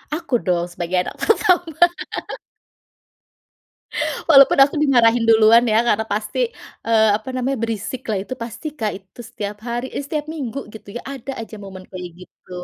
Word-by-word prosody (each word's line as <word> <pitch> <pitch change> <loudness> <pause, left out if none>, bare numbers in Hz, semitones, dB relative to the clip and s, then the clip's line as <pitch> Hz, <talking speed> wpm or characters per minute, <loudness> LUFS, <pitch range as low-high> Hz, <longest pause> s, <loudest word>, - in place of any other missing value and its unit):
Aku 305 -7 -1
dong 175 -2 0
sebagai 180 +1 -2
anak - - -6
pertama. 355 -7 +2 2.5
Walaupun 275 -3 +7
aku 285 - -1
dimarahin 240 -4 +4
duluan 225 +1 +6
ya 220 - +5
karena 220 0 +2
pasti, 210 - -3 0.5
eee, 220 -1 +4
apa 220 - -10
namanya? 260 +2 -1
Berisiklah 225 0 -3
itu 255 - -6
pasti 235 +6 -7
Kak 215 -2 0
itu 190 +4 -22
setiap 205 0 -5
hari, 240 +2 -2
eh, 285 - -2
setiap 300 0 -3
minggu 275 -5 -5
gitu 215 -2 -12
ya - - -8
ada 270 0 -7
aja 220 -1 -9
momen 190 -1 -9
kayak 180 -1 -7
gitu. 180 - -18
230 Hz, 150 wpm, -20 LUFS, 205-270 Hz, 2.5 s, Walaupun